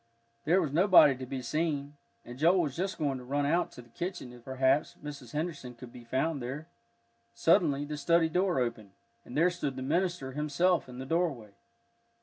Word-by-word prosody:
There 175 Hz, +5 st, +4 dB
was 150 Hz, -, -3 dB
nobody 170 Hz, -5 st, +6 dB
to 130 Hz, 0 st, -7 dB
be 130 Hz, 0 st, -5 dB
seen, 145 Hz, +1 st, -2 dB, 0.3 s
and 120 Hz, +1 st, -10 dB
Joel 175 Hz, +4 st, +4 dB
was 145 Hz, -5 st, -2 dB
just 190 Hz, +3 st, -2 dB
going 140 Hz, -3 st, -1 dB
to -, -, -10 dB
run 140 Hz, +3 st, -1 dB
out 170 Hz, +5 st, +1 dB
to 125 Hz, -, -11 dB
the 120 Hz, -, -22 dB
kitchen, 175 Hz, -3 st, -5 dB
if, 120 Hz, -1 st, -14 dB
perhaps, 130 Hz, +2 st, +1 dB
Mrs. 140 Hz, -5 st, -8 dB
Henderson 150 Hz, -5 st, -4 dB
could 120 Hz, 0 st, -12 dB
be 120 Hz, -, -11 dB
found 135 Hz, +5 st, -1 dB
there. 135 Hz, +6 st, -5 dB, 0.7 s
Suddenly 145 Hz, 0 st, +3 dB
the 150 Hz, 0 st, -5 dB
study 165 Hz, +3 st, +3 dB
door 180 Hz, +2 st, +1 dB
opened, 115 Hz, -5 st, -3 dB, 0.3 s
and 125 Hz, -, -7 dB
there 175 Hz, +3 st, +4 dB
stood 145 Hz, -6 st, -3 dB
the 130 Hz, -, -5 dB
minister 170 Hz, -1 st, -1 dB
himself 150 Hz, +2 st, +1 dB
in 125 Hz, -, -9 dB
the 130 Hz, -, -6 dB
doorway. 140 Hz, -, -1 dB
145 Hz, 190 wpm, -30 LUFS, 130-170 Hz, 0.7 s, nobody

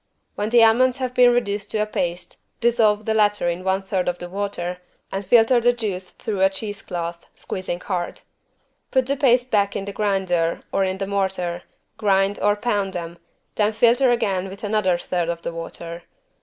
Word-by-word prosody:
When 210 Hz, +1 st, -2 dB
the 235 Hz, 0 st, +6 dB
almonds 250 Hz, +3 st, +4 dB
have 255 Hz, -2 st, -3 dB
been 250 Hz, -1 st, +6 dB
reduced 205 Hz, -4 st, -1 dB
to -, -, -2 dB
a 210 Hz, -, +1 dB
paste, 175 Hz, -4 st, -3 dB, 0.2 s
dissolve 220 Hz, -3 st, +2 dB
the 220 Hz, -, +1 dB
latter 205 Hz, -4 st, +2 dB
in 175 Hz, +1 st, -2 dB
one 190 Hz, +1 st, 0 dB
third 190 Hz, -2 st, -1 dB
of 180 Hz, 0 st, 0 dB
the 175 Hz, 0 st, -8 dB
water 180 Hz, -2 st, -4 dB, 0.3 s
and 195 Hz, +1 st, -3 dB
filter 230 Hz, +4 st, +5 dB
the 245 Hz, +1 st, +4 dB
juice 195 Hz, -6 st, -4 dB
through 205 Hz, -3 st, -4 dB
a 190 Hz, -, +6 dB
cheese 205 Hz, +1 st, -4 dB
cloth, 170 Hz, -1 st, -5 dB
squeezing 185 Hz, -2 st, -5 dB
hard. 180 Hz, -3 st, -3 dB, 0.7 s
Put 260 Hz, -2 st, +2 dB
the 275 Hz, +2 st, 0 dB
paste, 255 Hz, -2 st, +2 dB
back 200 Hz, -2 st, +2 dB
in 195 Hz, -, -3 dB
the 200 Hz, -, -6 dB
grinder 190 Hz, -5 st, 0 dB
or 195 Hz, -, +1 dB
in 190 Hz, 0 st, -1 dB
the 195 Hz, -, -2 dB
mortar, 190 Hz, -3 st, -1 dB, 0.4 s
grind 200 Hz, -1 st, +2 dB
or 205 Hz, 0 st, +3 dB
pound 205 Hz, -4 st, -1 dB
again, 170 Hz, 0 st, -6 dB, 0.3 s
then 210 Hz, 0 st, +1 dB
filter 240 Hz, +4 st, +4 dB
again 195 Hz, -6 st, 0 dB
with 195 Hz, +2 st, -11 dB
another 205 Hz, -4 st, +1 dB
third 175 Hz, -1 st, -2 dB
of 170 Hz, 0 st, -4 dB
the -, -, -4 dB
water. 165 Hz, 0 st, -7 dB
200 Hz, 190 wpm, -22 LUFS, 180-220 Hz, 0.7 s, the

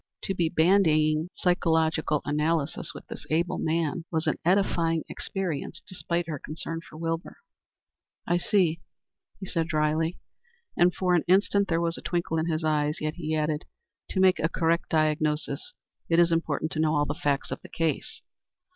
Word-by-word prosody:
To 195 Hz, -, -1 dB
be 170 Hz, -3 st, +1 dB
bandying 160 Hz, -2 st, +3 dB
psychological 160 Hz, -4 st, +1 dB
analyses 150 Hz, 0 st, 0 dB
with -, -, -11 dB
this -, -, -8 dB
able 170 Hz, +3 st, 0 dB
man 165 Hz, +1 st, 0 dB
was 160 Hz, -1 st, 0 dB
an -, -, 0 dB
edifying 170 Hz, -3 st, +2 dB
experience 170 Hz, -4 st, -4 dB
despite 175 Hz, -2 st, -2 dB
her 155 Hz, -4 st, -4 dB
concern 165 Hz, +2 st, -5 dB
for 155 Hz, -, -13 dB
Wilbur. 165 Hz, +1 st, -3 dB, 0.9 s
"I 175 Hz, -, +2 dB
see," 175 Hz, -3 st, +1 dB, 0.6 s
he 195 Hz, -, -6 dB
answered 165 Hz, -3 st, -1 dB
dryly, 155 Hz, +2 st, 0 dB, 0.6 s
and 175 Hz, +1 st, +5 dB
for 180 Hz, 0 st, 0 dB
an 175 Hz, -, +3 dB
instant 200 Hz, +2 st, +3 dB
there 165 Hz, -1 st, +1 dB
was 170 Hz, 0 st, -1 dB
a -, -, -11 dB
twinkle 170 Hz, -2 st, -1 dB
in 160 Hz, -, -1 dB
his 160 Hz, -1 st, -1 dB
eyes. 150 Hz, 0 st, +1 dB
Yet 155 Hz, 0 st, -2 dB
he 160 Hz, -2 st, -3 dB
added, 155 Hz, 0 st, -1 dB, 0.4 s
"To 190 Hz, -, -2 dB
make 185 Hz, -1 st, +5 dB
a 165 Hz, -, +1 dB
correct 170 Hz, 0 st, 0 dB
diagnosis 155 Hz, -, 0 dB, 0.4 s
it 165 Hz, -, +3 dB
is 170 Hz, 0 st, +5 dB
important 160 Hz, -1 st, 0 dB
to 155 Hz, -, -3 dB
know 155 Hz, 0 st, +2 dB
all 145 Hz, 0 st, +2 dB
the 145 Hz, -, -2 dB
facts 145 Hz, -2 st, -1 dB
of -, -, -4 dB
the -, -, -12 dB
case." 165 Hz, -2 st, -2 dB
165 Hz, 170 wpm, -27 LUFS, 155-175 Hz, 0.9 s, and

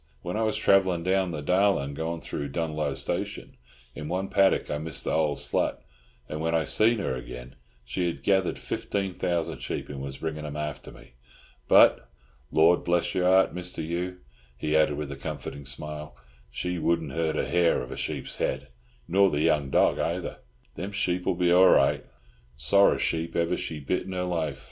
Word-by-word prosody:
When 90 Hz, +2 st, -3 dB
I 110 Hz, -, 0 dB
was 110 Hz, -1 st, +1 dB
travellin' 95 Hz, -3 st, +3 dB
down 95 Hz, 0 st, +1 dB
the 75 Hz, -4 st, -5 dB
Darlin', 90 Hz, -5 st, +2 dB
goin' 80 Hz, +2 st, -3 dB
through 70 Hz, -, -4 dB
Dunloe 75 Hz, -2 st, -2 dB
Station, -, -, -4 dB, 0.4 s
in 75 Hz, -, -7 dB
one 95 Hz, +3 st, -2 dB
paddock 95 Hz, -1 st, +3 dB
I 75 Hz, -, -1 dB
missed 80 Hz, -1 st, -4 dB
th' -, -, -2 dB
old 75 Hz, -2 st, +1 dB
slut, -, -, 0 dB, 0.5 s
and 75 Hz, 0 st, -5 dB
when 80 Hz, +1 st, 0 dB
I 80 Hz, -, +2 dB
see 110 Hz, +10 st, +3 dB
her 100 Hz, -, -2 dB
again, 60 Hz, 0 st, -8 dB, 0.3 s
she 90 Hz, +8 st, -1 dB
had 85 Hz, -, -4 dB
gethered 95 Hz, -2 st, +2 dB
fifteen 95 Hz, -2 st, -3 dB
thousand 85 Hz, -1 st, -2 dB
sheep, -, -, -5 dB
and 70 Hz, -2 st, -6 dB
was 70 Hz, 0 st, -6 dB
bringin' 80 Hz, -1 st, -4 dB
'em 75 Hz, -1 st, -6 dB
after 75 Hz, -2 st, -5 dB
me. -, -, -16 dB, 0.6 s
But, -, -, +6 dB, 0.4 s
Lord 85 Hz, +3 st, +4 dB
bless 85 Hz, -1 st, +1 dB
your 90 Hz, -1 st, +1 dB
heart, 95 Hz, +1 st, +4 dB
Mr. 90 Hz, -2 st, -4 dB
Hugh," 90 Hz, +2 st, -3 dB, 0.4 s
he 75 Hz, +4 st, -1 dB
added 75 Hz, -2 st, +3 dB
with 75 Hz, -2 st, -4 dB
a -, -, -5 dB
comforting 70 Hz, 0 st, -6 dB
smile, 75 Hz, +3 st, -6 dB, 0.3 s
"she 90 Hz, +7 st, -3 dB
wouldn't 80 Hz, -3 st, 0 dB
hurt 80 Hz, +1 st, -1 dB
a -, -, 0 dB
hair 85 Hz, +2 st, +3 dB
of 65 Hz, -, -9 dB
a -, -, -5 dB
sheep's -, -, -5 dB
head, 65 Hz, -, -2 dB, 0.4 s
nor 100 Hz, +2 st, +4 dB
the 75 Hz, -2 st, -1 dB
young 75 Hz, -4 st, +2 dB
dog -, -, +3 dB
ayther. 85 Hz, +1 st, -2 dB, 0.4 s
Them 95 Hz, +10 st, -5 dB
sheep'll 90 Hz, -3 st, 0 dB
be 90 Hz, 0 st, +2 dB
all 90 Hz, +1 st, +7 dB
right. -, -, +4 dB, 0.5 s
Sorra 100 Hz, +9 st, +4 dB
sheep 80 Hz, 0 st, -1 dB
ever 85 Hz, 0 st, +1 dB
she 80 Hz, -, -5 dB
bit 75 Hz, +8 st, -2 dB
in 95 Hz, -, -5 dB
her 90 Hz, -1 st, -1 dB
life. 80 Hz, -6 st, -2 dB
80 Hz, 185 wpm, -27 LUFS, 75-90 Hz, 0.6 s, all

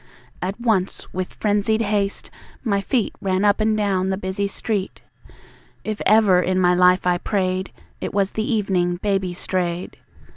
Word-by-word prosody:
At 190 Hz, +4 st, -3 dB
once, 215 Hz, -6 st, -1 dB
with 185 Hz, 0 st, -4 dB
frenzied 210 Hz, +1 st, +1 dB
haste, 205 Hz, -2 st, -1 dB, 0.3 s
my 200 Hz, -4 st, +1 dB
feet 235 Hz, +2 st, 0 dB
Ran 190 Hz, +1 st, +1 dB
up 205 Hz, +1 st, +3 dB
and 215 Hz, 0 st, +2 dB
down 190 Hz, -3 st, 0 dB
the 190 Hz, -, -1 dB
busy 190 Hz, +1 st, -2 dB
street. 200 Hz, -1 st, -3 dB, 0.8 s
If 215 Hz, -1 st, -4 dB
ever 210 Hz, -4 st, +5 dB
in 185 Hz, +1 st, 0 dB
my 180 Hz, -1 st, +4 dB
life 180 Hz, +1 st, +4 dB
I 175 Hz, -1 st, +2 dB
prayed, 185 Hz, -1 st, -1 dB, 0.3 s
It -, -, -4 dB
was 195 Hz, -1 st, +1 dB
the 220 Hz, +2 st, -2 dB
evening 185 Hz, -5 st, +1 dB
Baby 190 Hz, -1 st, -1 dB
strayed. 180 Hz, -1 st, -2 dB
195 Hz, 155 wpm, -22 LUFS, 185-210 Hz, 0.8 s, ever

